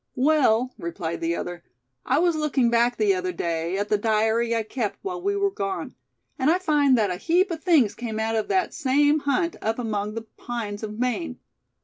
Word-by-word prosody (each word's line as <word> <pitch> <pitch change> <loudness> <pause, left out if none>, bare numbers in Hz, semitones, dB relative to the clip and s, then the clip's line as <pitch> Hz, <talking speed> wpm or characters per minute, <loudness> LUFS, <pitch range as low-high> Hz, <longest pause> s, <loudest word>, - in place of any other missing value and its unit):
"Well," 255 -4 +3
replied 170 0 -4
the 165 +1 0
other, 175 0 -5 0.4
"I - - +3
was 345 +1 +3
looking 285 -6 +1
back 235 +1 +2
the 210 -2 +3
other 185 0 -2
day, 170 +1 -2
at 205 +1 -2
the 210 - +2
diary 225 +2 +1
I 225 - 0
kept 220 -1 -3
while 360 -2 -4
we 400 +2 0
were 400 0 +1
gone; 195 - -4 0.5
and 265 +3 +3
I 340 - +4
find 295 -7 +3
that 210 -4 +1
a 180 - -3
heap 355 - +2
of 320 -2 -5
things 290 - +4
came 225 -2 -5
out 225 +1 0
of 220 - 0
that 375 -1 0
same 290 +1 +3
hunt 325 +5 0
up 225 +1 -1
among 210 -3 -3
the 230 - -4
pines 220 -4 -5
of 215 -1 -6
Maine. 250 +3 -2
235 Hz, 205 wpm, -24 LUFS, 210-300 Hz, 0.5 s, I